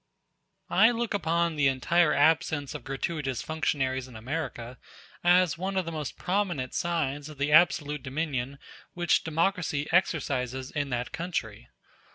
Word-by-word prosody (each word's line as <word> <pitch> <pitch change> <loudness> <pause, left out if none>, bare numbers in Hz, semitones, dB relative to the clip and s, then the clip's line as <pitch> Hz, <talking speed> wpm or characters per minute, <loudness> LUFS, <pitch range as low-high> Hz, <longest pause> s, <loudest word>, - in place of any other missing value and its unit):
I 220 +5 +6
look 235 -2 -2
upon 170 -3 +1
the 145 -2 +4
entire 150 +5 +3
absence 150 -1 +2
of - - -7
gratuitous 135 -1 -3
functionaries 135 -5 -1
in 125 - -13
America 125 -1 -5 0.4
as 175 -3 +4
one 190 +1 -2
of 185 - +1
the 165 - -4
most 155 -4 -5
prominent 180 -9 -1
signs 150 -4 -1
of 150 - -11
the 145 +2 0
absolute 150 -3 +4
dominion 140 -1 -3 0.4
which 175 -1 +2
democracy 165 -2 0
exercises 130 -7 0
in 145 -2 -2
that 125 -1 -3
country. 110 - -4
150 Hz, 140 wpm, -28 LUFS, 135-170 Hz, 0.4 s, I